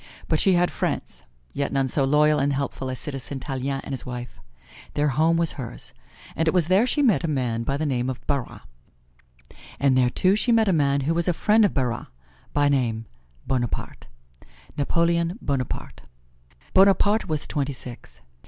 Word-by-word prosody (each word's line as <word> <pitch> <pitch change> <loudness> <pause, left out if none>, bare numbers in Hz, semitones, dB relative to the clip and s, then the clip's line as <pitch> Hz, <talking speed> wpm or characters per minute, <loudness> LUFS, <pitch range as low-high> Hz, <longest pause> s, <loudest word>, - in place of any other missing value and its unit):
But - - +1
she 195 - +4
had 175 0 +2
friends, 65 - -3 0.3
yet 140 0 -2
none 135 -1 +1
so 135 +2 +1
loyal 150 +2 +4
and 140 +1 +1
helpful 135 -1 -3
as 130 - -4
Citizen 135 +1 -5
Tallien 135 0 -3
and 140 - -6
his 130 - -4
wife. 125 -1 -7 0.6
Their 145 0 +2
home 160 +4 +2
was 165 -1 +2
hers. 120 -3 -8 0.4
And 165 - 0
it 160 - +2
was 175 -2 +2
there 195 +6 +4
she 290 +3 +1
met 225 -8 +3
a - - 0
man 125 -6 -1
by 135 +4 -1
the 155 - -2
name 130 -3 0
of 130 - -6
Barras, 140 -4 -3 1.2
and 135 -2 +3
there 125 -1 +4
too 185 +10 +2
she 235 +3 +1
met 225 -2 +4
a 190 - +3
man 140 -3 +2
who 150 +5 0
was 170 +1 0
a 180 - +3
friend 215 +6 +3
of 205 - +2
Barras; 125 -4 -1 0.4
by 145 0 +2
name, 120 -5 0 0.4
Bonaparte 125 -3 -3 0.7
Napoleon 170 +4 +1
Bonaparte. 135 -4 -3 0.7
Bonaparte 200 +3 +4
was 155 -3 -2
twenty 140 -1 -2
six. 120 -1 -10
140 Hz, 180 wpm, -24 LUFS, 130-170 Hz, 1.2 s, she